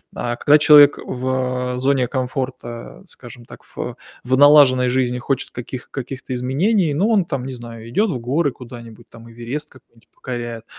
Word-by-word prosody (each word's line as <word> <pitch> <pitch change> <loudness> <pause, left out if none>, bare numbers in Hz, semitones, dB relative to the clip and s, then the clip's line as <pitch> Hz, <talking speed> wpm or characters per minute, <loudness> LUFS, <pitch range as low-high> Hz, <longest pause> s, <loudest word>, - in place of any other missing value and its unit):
А 120 0 -3
когда 150 +4 +4
человек 145 -1 +7
в, 125 0 -2
а, - - -5
зоне 130 -2 +1
комфорта, 130 -1 -5
скажем 120 -4 -13
так, - - -14
в - - -7 0.3
в 130 +1 0
налаженной 140 -3 +6
жизни 125 -1 0
хочет 130 +2 -2
каких 125 +1 -8
каких-то 130 -1 -7
изменений, 155 - 0
ну, 195 +10 +1
он 205 -5 +2
там, 135 -5 -4
не 130 - -6
знаю, 115 -2 -10
идёт 205 - +1
в 130 - -4
горы 140 +5 0
куда-нибудь, 120 -3 -12
там 115 0 -14
Эверест 120 +6 -6
какой-нибудь 120 -3 -23
покоряет, 120 -2 -7
130 Hz, 165 wpm, -19 LUFS, 120-140 Hz, 0.3 s, человек